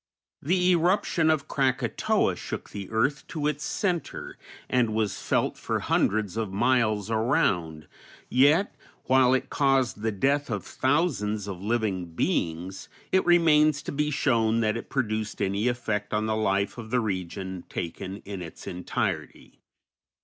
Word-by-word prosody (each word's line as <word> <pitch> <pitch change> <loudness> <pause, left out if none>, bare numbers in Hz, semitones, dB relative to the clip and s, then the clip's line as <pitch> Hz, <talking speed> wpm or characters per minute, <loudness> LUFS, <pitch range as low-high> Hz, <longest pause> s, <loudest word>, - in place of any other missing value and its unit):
The 180 +4 +2
eruption 175 -2 +2
of 155 -3 +1
Krakatoa 130 -3 +1
shook - - -6
the 100 -2 -7
earth 135 +6 0
to 155 -3 -4
its 150 0 -1
centre 180 -5 -2 0.3
and 120 -4 +1
was 110 -3 -1
felt - - 0
for - - -1
hundreds 105 0 0
of 110 -4 -2
miles 110 -1 +1
around, 90 -8 0 0.4
yet, 145 +10 +4 0.3
while 130 0 +4
it 130 - -3
caused 135 -6 +2
the 110 0 0
death 140 +8 +1
of 105 -5 -3
thousands 125 - 0
of 95 -3 -6
living 100 -6 -1
beings, 85 +5 -2 0.2
it 190 - +4
remains 155 -4 +4
to - - -4
be 150 +1 0
shown 115 -6 +2
that 110 -1 +1
it 115 - -6
produced 110 -5 -2
any 100 +3 0
effect 110 -4 -1
on 105 0 0
the 110 0 0
life 100 0 0
of 110 -2 -8
the 125 +2 +2
region 95 -3 -4
taken 95 +4 -5
in 100 -2 -6
its 85 -2 -9
entirety. 90 0 -4
110 Hz, 145 wpm, -26 LUFS, 100-140 Hz, 0.4 s, yet